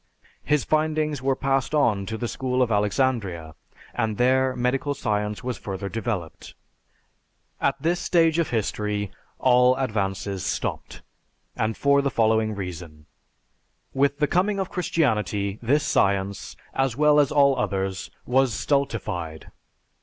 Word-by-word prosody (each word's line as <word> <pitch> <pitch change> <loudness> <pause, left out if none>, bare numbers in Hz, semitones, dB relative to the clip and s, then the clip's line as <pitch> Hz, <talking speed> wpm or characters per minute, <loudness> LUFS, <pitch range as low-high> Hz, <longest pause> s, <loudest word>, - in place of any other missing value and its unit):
His 150 -1 +1
findings 155 -2 0
were 135 0 +1
passed 135 +1 0
on 105 -9 +2
to 110 - -3
the 120 - -3
School 130 +1 0
of 120 - -2
Alexandria, 105 - 0 0.4
and 110 -3 -1
there 130 +1 +2
medical 130 +3 0
science 105 -3 -2
was 125 -1 -4
further 100 0 -5
developed. 110 -7 -5 1.1
At - - +1
this 175 +2 0
stage 165 -2 +2
of 165 - 0
history 105 -2 -2 0.3
all 125 0 +4
advances 100 -6 -2
stopped, - - -4 0.5
and 110 0 -1
for 140 0 +3
the 140 - 0
following 110 -2 +1
reason: 85 -5 -7 0.9
With 140 +1 +2
the 150 - +2
coming 195 +6 +1
of 190 - -3
Christianity 105 - 0
this 140 +6 +2
science, 100 -7 0 0.2
as 135 -2 0
well 150 0 +5
as 145 -2 +3
all 140 -2 +4
others, 95 -3 -2 0.2
was 130 -2 +2
stultified. 95 - -2
125 Hz, 130 wpm, -24 LUFS, 100-140 Hz, 1.1 s, well